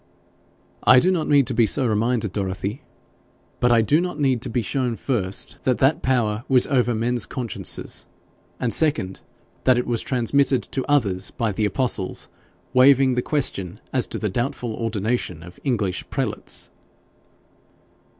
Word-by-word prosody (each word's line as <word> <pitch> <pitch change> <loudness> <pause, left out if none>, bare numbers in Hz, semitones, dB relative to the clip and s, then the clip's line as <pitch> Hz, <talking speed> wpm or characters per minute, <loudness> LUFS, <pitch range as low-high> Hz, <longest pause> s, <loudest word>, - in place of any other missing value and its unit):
'I 125 - +7
do 185 +7 +3
not 165 -4 0
need 145 -2 +4
to 125 - -1
be 115 -1 +3
so 130 - +1
reminded, 110 -1 0
Dorothy, 100 +5 -3 0.8
but 125 - +3
I 115 -1 +5
do 150 +9 +3
not 180 -4 -4
need 130 -5 +1
to - - -5
be 120 - -1
shown 125 +1 -1
first 100 -7 -2
that 130 -2 +1
that 135 +4 +2
power 120 -4 0
was 130 -2 +6
over 125 -4 +1
men's 120 +2 -1
consciences; 115 - -4 0.5
and 120 -2 0
second, 145 -12 0 0.4
that 130 -1 +4
it 125 - 0
was 120 -2 -1
transmitted 130 0 +1
to 130 - -2
others 100 -10 +1
by 115 -2 -2
the 105 +2 -1
apostles 110 -4 -1 0.4
waiving 130 0 +5
the 125 - 0
question 105 - -2
as 130 - +1
to - - -5
the 105 - -2
doubtful 120 +2 -2
ordination 110 -6 -2
of 90 +1 -13
English 105 -9 -1
prelates.' - - -3
120 Hz, 155 wpm, -23 LUFS, 105-130 Hz, 0.8 s, I